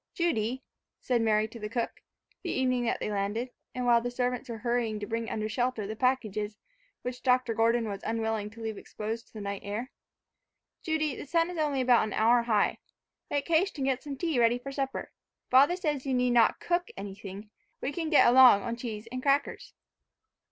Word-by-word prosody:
"Judy," 260 Hz, -7 st, 0 dB, 0.4 s
said 245 Hz, -2 st, 0 dB
Mary 215 Hz, -1 st, +2 dB
to 230 Hz, +1 st, -11 dB
the 210 Hz, 0 st, -5 dB
cook, 235 Hz, +1 st, -3 dB, 0.4 s
the -, -, -5 dB
evening 255 Hz, -2 st, +1 dB
that 230 Hz, -, 0 dB
they -, -, -3 dB
landed, 205 Hz, +5 st, -2 dB, 0.2 s
and 250 Hz, -1 st, -2 dB
while 235 Hz, -1 st, +5 dB
the 245 Hz, -, -2 dB
servants 250 Hz, +1 st, -2 dB
were 230 Hz, -, -4 dB
hurrying 230 Hz, -1 st, -1 dB
to 205 Hz, -, -4 dB
bring 230 Hz, +2 st, -3 dB
under 215 Hz, 0 st, -2 dB
shelter 245 Hz, -1 st, -1 dB
the 215 Hz, +2 st, -5 dB
packages 215 Hz, -4 st, -1 dB, 0.5 s
which 250 Hz, 0 st, -5 dB
Dr. 250 Hz, -2 st, +2 dB
Gordon 230 Hz, +1 st, +2 dB
was 200 Hz, -1 st, -5 dB
unwilling 220 Hz, -2 st, -1 dB
to 225 Hz, +2 st, -13 dB
leave 220 Hz, -2 st, -4 dB
exposed 225 Hz, +2 st, -6 dB
to -, -, -28 dB
the 215 Hz, -, -7 dB
night 200 Hz, -1 st, -4 dB
air, 215 Hz, +6 st, -4 dB, 0.9 s
"Judy, 310 Hz, -4 st, -1 dB
the -, -, -8 dB
sun 335 Hz, +3 st, +1 dB
is 345 Hz, -, -5 dB
only 290 Hz, -3 st, +1 dB
about 250 Hz, -2 st, +5 dB
an 215 Hz, -, -5 dB
hour 235 Hz, +2 st, +4 dB
high. 220 Hz, -3 st, +1 dB, 0.5 s
Make 285 Hz, -1 st, -1 dB
haste 340 Hz, +3 st, +2 dB
and 270 Hz, -, -1 dB
get 265 Hz, -1 st, 0 dB
some 280 Hz, -2 st, -6 dB
tea 325 Hz, -6 st, 0 dB
ready 235 Hz, +1 st, +4 dB
for 275 Hz, +3 st, -7 dB
supper. 270 Hz, -1 st, -3 dB, 0.4 s
Father 280 Hz, +7 st, +6 dB
says 300 Hz, -7 st, -2 dB
you 265 Hz, -, +1 dB
need 250 Hz, 0 st, +2 dB
not 235 Hz, -2 st, +4 dB
cook 350 Hz, 0 st, 0 dB
anything, 200 Hz, +1 st, -8 dB, 0.3 s
we 270 Hz, -, -2 dB
can 325 Hz, +1 st, -3 dB
get 305 Hz, -, +6 dB
along 245 Hz, -5 st, +7 dB
on 235 Hz, 0 st, -3 dB
cheese 225 Hz, -3 st, -6 dB
and 255 Hz, 0 st, -4 dB
crackers." 280 Hz, +1 st, 0 dB
240 Hz, 200 wpm, -29 LUFS, 220-265 Hz, 0.9 s, along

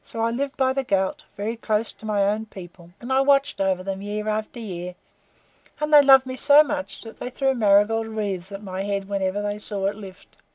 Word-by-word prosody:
So 225 Hz, -, -6 dB
I 230 Hz, +1 st, +1 dB
lived 275 Hz, +3 st, -3 dB
by 260 Hz, -1 st, +2 dB
the 270 Hz, 0 st, -1 dB
Ghaut, 205 Hz, +8 st, -1 dB
very 215 Hz, +3 st, -3 dB
close 220 Hz, -1 st, -1 dB
to 220 Hz, -, -11 dB
my 205 Hz, -2 st, +1 dB
own 210 Hz, +2 st, -1 dB
people, 175 Hz, -3 st, -12 dB
and 245 Hz, +2 st, -4 dB
I 265 Hz, -, +4 dB
watched 275 Hz, -4 st, +2 dB
over 190 Hz, -1 st, 0 dB
them 195 Hz, 0 st, -4 dB
year 210 Hz, +1 st, -4 dB
after 215 Hz, +2 st, -3 dB
year; 180 Hz, -5 st, -6 dB, 0.8 s
and 300 Hz, 0 st, -2 dB
they 295 Hz, -, +10 dB
loved 270 Hz, -1 st, +6 dB
me 255 Hz, 0 st, -5 dB
so 285 Hz, +3 st, +6 dB
much 195 Hz, -8 st, -5 dB
that 225 Hz, -, -11 dB
they -, -, -5 dB
threw 270 Hz, +1 st, 0 dB
marigold 220 Hz, 0 st, +3 dB
wreaths 200 Hz, -4 st, -4 dB
at 200 Hz, +1 st, -8 dB
my 190 Hz, -1 st, -5 dB
head 200 Hz, -1 st, -3 dB
whenever 195 Hz, 0 st, -2 dB
they 205 Hz, 0 st, -3 dB
saw 205 Hz, -2 st, -3 dB
it 200 Hz, +1 st, 0 dB
lift. 195 Hz, -3 st, -13 dB
210 Hz, 220 wpm, -23 LUFS, 195-250 Hz, 0.8 s, they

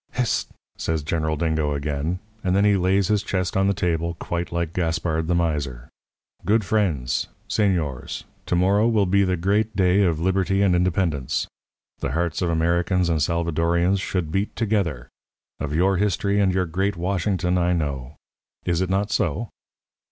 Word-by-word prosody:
"'Hist!' 125 Hz, -4 st, 0 dB, 0.3 s
says 80 Hz, -2 st, -1 dB
General 80 Hz, 0 st, -1 dB
Dingo 80 Hz, -2 st, 0 dB
again, 75 Hz, +4 st, -2 dB, 0.3 s
and 90 Hz, 0 st, +1 dB
then 100 Hz, +1 st, +4 dB
he 105 Hz, -1 st, +4 dB
lays 95 Hz, +1 st, +2 dB
his 105 Hz, -2 st, +2 dB
chest 95 Hz, -3 st, -2 dB
on 95 Hz, 0 st, +3 dB
the 100 Hz, -, +3 dB
table 85 Hz, -2 st, -1 dB
quite 85 Hz, +1 st, -4 dB
like 85 Hz, -1 st, -2 dB
Gaspard 80 Hz, -2 st, -1 dB
the 90 Hz, -, +1 dB
Miser. 75 Hz, -8 st, -2 dB, 0.5 s
'Good 110 Hz, 0 st, +2 dB
friends, 80 Hz, -, 0 dB, 0.2 s
señores, 85 Hz, -, -1 dB, 0.2 s
to -, -, +1 dB
morrow 100 Hz, +5 st, +3 dB
will 110 Hz, -4 st, +3 dB
be 100 Hz, +2 st, +3 dB
the 95 Hz, -1 st, +1 dB
great 105 Hz, +5 st, +1 dB
day 95 Hz, +1 st, +3 dB
of 85 Hz, -5 st, +2 dB
Liberty 95 Hz, +2 st, +1 dB
and 95 Hz, -3 st, +3 dB
Independence. 85 Hz, -6 st, 0 dB, 0.5 s
The -, -, -3 dB
hearts 85 Hz, 0 st, -1 dB
of 90 Hz, -, +1 dB
Americans 85 Hz, +2 st, +1 dB
and 80 Hz, -2 st, +1 dB
Salvadorians 85 Hz, +3 st, +1 dB
should 90 Hz, -6 st, -2 dB
beat 95 Hz, +4 st, -1 dB
together. 100 Hz, -, -1 dB, 0.5 s
Of 75 Hz, +1 st, -3 dB
your 95 Hz, +3 st, +3 dB
history 100 Hz, +1 st, +1 dB
and 95 Hz, -2 st, +3 dB
your 95 Hz, 0 st, +1 dB
great 95 Hz, +4 st, -1 dB
Washington 90 Hz, 0 st, 0 dB
I 90 Hz, +1 st, +2 dB
know. 70 Hz, -4 st, -3 dB, 0.5 s
Is 85 Hz, 0 st, +1 dB
it 95 Hz, -, -1 dB
not 100 Hz, +2 st, 0 dB
so?' 115 Hz, 0 st, -1 dB
90 Hz, 165 wpm, -23 LUFS, 80-95 Hz, 0.5 s, then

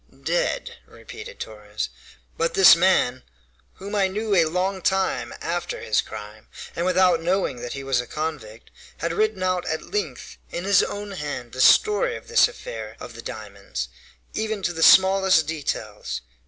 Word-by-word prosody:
"Dead," -, -, -1 dB
repeated 445 Hz, +3 st, -11 dB
Torres; 105 Hz, 0 st, -5 dB, 0.5 s
"but 165 Hz, +1 st, -1 dB
this 190 Hz, -3 st, +9 dB
man, 170 Hz, -8 st, +2 dB, 0.5 s
whom 200 Hz, +2 st, -9 dB
I 200 Hz, -2 st, +3 dB
knew 210 Hz, +2 st, -2 dB
a 170 Hz, -4 st, +5 dB
long 185 Hz, +4 st, -1 dB
time 190 Hz, +1 st, 0 dB
after 175 Hz, +1 st, -3 dB
his 105 Hz, -, +1 dB
crime, 105 Hz, 0 st, -10 dB, 0.3 s
and 170 Hz, +2 st, -1 dB
without 180 Hz, -2 st, +3 dB
knowing 180 Hz, -5 st, 0 dB
that 120 Hz, -, -5 dB
he 140 Hz, -, -6 dB
was 135 Hz, -2 st, +1 dB
a 125 Hz, -, -11 dB
convict, 145 Hz, -8 st, -6 dB, 0.3 s
had 170 Hz, +1 st, -2 dB
written 215 Hz, 0 st, 0 dB
out 185 Hz, -1 st, 0 dB
at 155 Hz, -, -4 dB
length, 420 Hz, 0 st, -4 dB
in 175 Hz, -, -5 dB
his 195 Hz, -1 st, +5 dB
own 205 Hz, 0 st, -4 dB
hand, 145 Hz, -9 st, -5 dB
the 130 Hz, -, -3 dB
story 440 Hz, -, +5 dB
of -, -, -15 dB
this 465 Hz, -, +5 dB
affair -, -, -8 dB
of -, -, -9 dB
the -, -, -9 dB
diamonds, -, -, -6 dB, 0.4 s
even 220 Hz, -2 st, -3 dB
to 175 Hz, -, 0 dB
the 165 Hz, -, -5 dB
smallest 190 Hz, -2 st, +6 dB
details. 140 Hz, -9 st, -4 dB
180 Hz, 165 wpm, -24 LUFS, 145-200 Hz, 0.5 s, this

